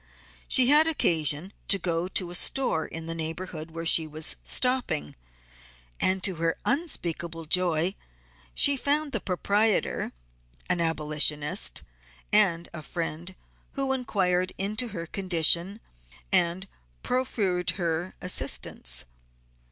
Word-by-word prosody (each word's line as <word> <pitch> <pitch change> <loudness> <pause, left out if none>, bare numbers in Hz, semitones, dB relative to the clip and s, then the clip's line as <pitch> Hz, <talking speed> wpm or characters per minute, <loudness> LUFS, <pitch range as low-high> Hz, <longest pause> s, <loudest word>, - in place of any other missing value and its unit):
She 255 -1 +5
had 305 +2 +6
occasion 160 - +1
to 200 - +4
go 170 -1 -2
to 180 -1 0
a - - -6
store 180 -5 +2
in 165 0 -8
the 165 - -4
neighborhood 165 0 -6
where 165 +1 -7
she 160 -1 +5
was 155 +1 -3
stopping, 250 - -1 0.8
and 185 0 +1
to 190 -4 +2
her 165 0 -1
unspeakable 170 - -2
joy 175 +1 +1 0.6
she 285 - +5
found 290 +2 +1
the - - 0
proprietor 205 +3 0 0.6
an 175 - 0
abolitionist 150 - +2 0.5
and 180 -5 +3
a 165 - -7
friend 170 +3 -5 0.4
who 270 -1 +2
inquired 185 -8 0
into 215 +5 0
her 175 -7 -6
condition 175 +2 +2 0.5
and 175 +3 +1 0.4
proffered 205 -8 -1
her 170 0 -2
assistance. 60 - 0
175 Hz, 115 wpm, -26 LUFS, 160-205 Hz, 0.8 s, had